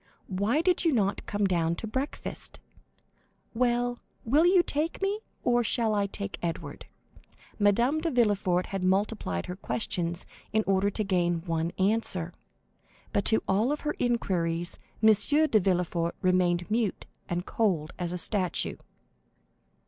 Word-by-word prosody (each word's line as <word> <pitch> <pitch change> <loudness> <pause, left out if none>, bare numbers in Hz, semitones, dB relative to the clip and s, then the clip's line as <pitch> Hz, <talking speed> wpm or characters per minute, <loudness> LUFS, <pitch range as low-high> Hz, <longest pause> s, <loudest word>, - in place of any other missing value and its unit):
Why 205 +10 +1
did 365 0 +3
you 330 - +3
not 200 -6 0
come 205 0 0
down 170 -3 +1
to 225 - -6
breakfast? 260 +6 -4 0.9
Well, 245 0 +1 0.3
will 295 +9 +4
you 360 -1 +5
take 310 +2 -1
me, 395 +2 0 0.2
or 240 -1 +3
shall 225 -1 +1
I 200 -1 +1
take 200 0 -5
Edward?" 170 -1 -5 0.7
Madame 235 +9 +3
de 335 - 0
Villefort 205 - +2
had 195 -2 -4
multiplied 190 - 0
her 180 - -5
questions 175 -3 -2 0.3
in 220 0 +2
order 195 +1 +2
to 215 +2 -2
gain 175 -4 0
one 165 -1 -1
answer, 190 -4 0 0.8
but 200 - +1
to 220 - +3
all 220 +9 +2
her 300 0 -3
inquiries 175 -8 0 0.2
M. 220 - +8
de 285 +4 +2
Villefort 175 -2 0
remained 180 0 +2
mute 225 -2 0 0.2
and 175 +1 -2
cold 180 -9 0
as 175 -1 -2
a 180 - -3
statue. 185 0 -1
200 Hz, 140 wpm, -28 LUFS, 180-240 Hz, 0.9 s, M